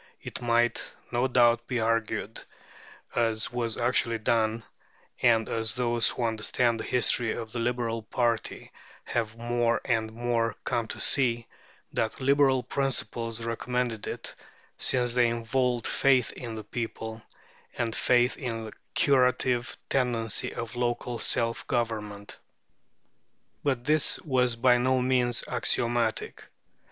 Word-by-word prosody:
It - - -7
might, 120 0 +1 0.2
no 125 +2 +2
doubt, 120 -2 +3
be 125 -2 -1
argued, 115 -1 -1 0.7
as 115 -2 0
was 115 -2 -1
actually 120 -1 +1
done, 110 0 +1 0.6
and 115 -2 +4
as 110 -2 -1
those 120 -3 +2
who 125 - -3
understand 115 +1 +1
the - - -3
history 120 -2 +2
of 115 -2 -6
the 120 - -4
Liberal 115 -1 -1
party 115 0 -2 0.3
have 115 -1 -2
more 120 0 +1
and 110 -2 0
more 115 0 0
come 120 -2 -1
to - - -7
see, 120 -4 +3 0.5
that 110 - -1
Liberal 135 -1 +3
principles 115 -4 -2
recommended 120 -1 -2
it, - - -5 0.4
since 125 -2 +1
they 125 -1 +4
involve 120 +1 0
faith 130 -3 +3
in 115 -3 -7
the 110 - -6
people, 110 0 -5 0.6
and 115 -2 -1
faith 125 0 +3
in 115 -3 -4
the 110 - -8 0.2
curative 125 -2 +2
tendency 120 -5 0
of 115 +1 -6
local 120 0 -2
self 115 0 0
government. 105 -4 -3 1.2
But 130 -4 0
this 150 +2 +2
was 125 -6 +2
by 120 +1 +4
no 130 +1 +2
means 125 -1 +2
axiomatic. 120 -2 0
120 Hz, 125 wpm, -28 LUFS, 115-125 Hz, 1.2 s, and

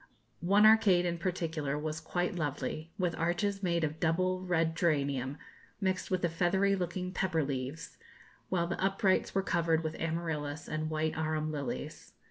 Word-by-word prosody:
One 200 +5 +4
arcade 205 -5 +6
in 170 -1 -1
particular 165 -5 -2
was 155 +1 -3
quite 175 +2 -1
lovely, 155 0 -3
with 180 -3 0
arches 175 +4 0
made 170 -3 +1
of 155 +1 -2
double 185 +2 +1
red 165 -3 +1
geranium, 140 -5 0 0.4
mixed 190 -2 -1
with 185 -1 0
the - - +4
feathery 190 +4 +2
looking 180 0 -3
pepper 185 -4 0
leaves, 135 +3 -4 0.5
while 175 -2 +1
the 175 +2 -3
uprights 195 0 +2
were 195 - +2
covered 165 -3 +1
with 155 0 -2
amaryllis 160 -3 -3
and 155 0 -2
white 155 0 -1
arum 155 0 -1
lilies. 140 - -5
165 Hz, 155 wpm, -32 LUFS, 155-185 Hz, 0.5 s, arcade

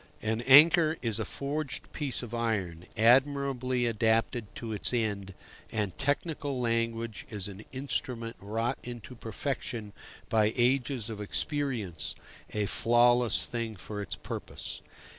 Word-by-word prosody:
An 110 +1 0
anchor 155 +3 +8
is 115 -2 0
a 110 - -1
forged 140 +1 -3
piece 140 -5 0
of 120 -1 -7
iron, 100 -8 -2
admirably 130 +1 +3
adapted 115 0 +1
to 115 -2 -5
its 105 +4 0
end, 100 -5 -1 0.4
and 105 -4 -1
technical 145 -1 -1
language 115 -2 -1
is 105 -4 -3
an 100 +1 -9
instrument 125 -3 -3
wrought 115 +4 -2
into 120 -1 -8
perfection 115 -2 -4 0.3
by 110 -2 +3
ages 125 -2 +1
of 105 -1 -6
experience, 120 - -1 0.4
a 105 -1 0
flawless 120 +3 +4
thing 115 -2 -3
for 105 +3 -6
its 100 - -3
purpose. - - -6
115 Hz, 125 wpm, -30 LUFS, 110-130 Hz, 0.4 s, anchor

